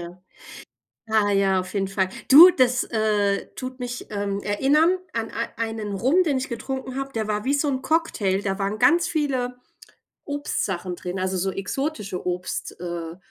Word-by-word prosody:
Ja. 175 +1 -10 0.9
Ah 215 -2 +3
ja, 195 -1 +3
auf 185 +2 -8
jeden 195 -1 0
Fall. 195 -1 0 0.2
Du, 325 +7 +11
das, 255 -5 +2
äh, 210 -3 0
tut 255 0 -6
mich, 245 0 -5
ähm, 200 -1 -2
erinnern 295 - +3 0.2
an 230 -1 -3
ei 230 - -3
einen 225 -2 -3
Rum, 260 - +3
den 290 -7 0
ich 260 - -4
getrunken 260 +2 -5
habe, 275 0 -4
der 220 -2 -2
war 210 0 -1
wie 270 - +1
so 290 +1 +1
'n 260 -1 -1
Cocktail. 215 - 0
Da 195 -1 -2
waren 200 +2 -2
ganz 340 +5 +4
viele 260 -6 -1 0.7
Obstsachen 190 -11 -3
drin, 180 +2 -5
also 185 0 -1
so 190 +1 0
exotische 200 - -4
Obst 180 +1 -3
äh, 170 -1 -5
220 Hz, 170 wpm, -24 LUFS, 195-270 Hz, 0.9 s, Du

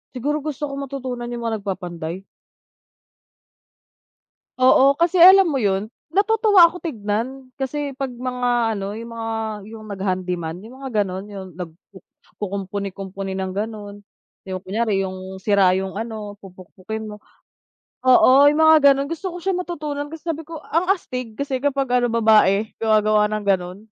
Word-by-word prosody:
Siguro 295 +5 -1
gusto 295 0 -4
ko 280 - -6
matutunan 260 -3 -5
yung 240 -1 -5
mga 225 -1 0
nagpapanday. 180 -2 -5 2.4
Oo, 260 +2 +6
kasi 340 +2 +2
alam 380 +1 +9
mo 295 - -1
'yon 200 +1 0 0.2
natutuwa 410 -2 +5
ako 360 +2 -9
tignan 245 0 -3
kasi 280 +1 -3
'pag 270 -2 -3
mga, 245 -2 -1
ano, 200 0 -4
yung 230 0 -8
mga 225 0 -4 0.4
yung 220 -1 -10
nag-handy 185 -2 -2
man 165 0 -5
yung 250 +6 -13
mga 265 - -4
ganon 190 +1 -6
yung 190 -2 -7
nagkukumpuni-kumpuni 195 +2 -7
ng 190 -1 -3
ganon, 205 -1 -5 0.4
yung 185 -1 -5
kunyari 200 +2 -1
yung 190 0 -7
sira 195 -2 +3
yung, 190 0 -5
ano, 215 -2 -5
pupukpukin 190 +3 -8
mo 210 - -7 0.9
oo, 260 +2 +6
yung 300 - -1
mga 315 -3 +7
ganon 275 +1 -2
gusto 335 +4 -4
ko - - -6
siya 385 +2 -1
matutunan 300 -5 -4
kasi 325 -1 -9
sabi 325 -1 -2
ko 325 -2 -7
ang 340 +3 0
astig 250 - -3
kasi 275 -2 -2
kapag 275 -1 0 0.2
ano 245 - +2
babae 220 -2 +3
gumagawa 215 -1 +3
ng 215 -1 -3
ganon. 185 -1 0
225 Hz, 150 wpm, -21 LUFS, 195-280 Hz, 2.4 s, alam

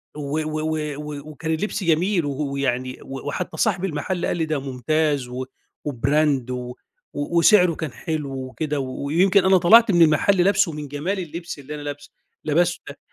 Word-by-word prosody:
و 150 +1 -3
و 155 0 -3
و 155 -1 -2
و 150 0 -7
وكان 160 +2 -4
اللبس 200 +5 -2
جميل، 170 +1 +2
و 145 - -2 0.2
ويعني 130 -2 -2
وحتى 145 +6 -5
صاحب 195 -4 +1
المحل 180 +1 -2
قال - - -1
لي 165 - 0
ده 155 -2 -1
مُمتاز، 140 +1 0
و 125 +1 -5 0.4
وBrand 140 0 +1
و 125 0 -5 0.4
وسعره 170 +4 +4
كان 155 -3 -4
حلو 155 0 -4
وكده، 135 +3 -3
ويمكن 160 +9 +2
أنا 190 0 +6
طلعت 215 +6 +6
من 175 -2 +4
المحل 165 +4 +4
لابسُه 200 -1 +3
من 150 -1 -6
جمال 155 +8 -3
اللبس 170 -2 -6
اللي 145 +2 -7
أنا 150 - -7
لابسُه، 145 0 -7 0.3
لبستُه 170 +3 +1
ده 145 - -11
155 Hz, 170 wpm, -22 LUFS, 140-175 Hz, 0.4 s, أنا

